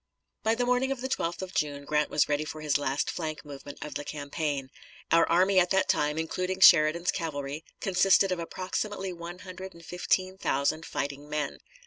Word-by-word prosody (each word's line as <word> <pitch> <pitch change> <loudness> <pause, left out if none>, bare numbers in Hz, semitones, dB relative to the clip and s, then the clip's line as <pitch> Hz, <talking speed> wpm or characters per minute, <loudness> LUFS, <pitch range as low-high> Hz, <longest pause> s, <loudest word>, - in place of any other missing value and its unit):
By 220 +1 +2
the 245 +1 0
morning 250 +2 +2
of 270 -2 -3
the 260 - -2
12th 175 -8 -2
of 185 - -7
June 145 -1 -1
Grant 150 +1 +1
was 150 - +2
ready 145 0 0
for 155 0 -7
his 150 -2 +1
last 140 0 -1
flank 155 -2 -4
movement 145 0 -9
of 150 - -7
the 145 - -4
campaign. 145 -2 -3 0.4
Our 165 0 +5
army 185 +3 +4
at 180 0 +3
that 190 -1 +2
time, 150 +1 +1
including 185 +3 -2
Sheridan's 170 -1 +6
cavalry, 145 -2 -4 0.2
consisted 195 0 +4
of 180 - -1
approximately 185 +2 -3
one 170 +1 -8
hundred 185 0 -8
and 170 0 -14
fifteen 185 +2 -1
thousand 150 +3 0
fighting 140 +1 -4
men. 150 -1 -2
165 Hz, 185 wpm, -28 LUFS, 150-185 Hz, 0.4 s, Sheridan's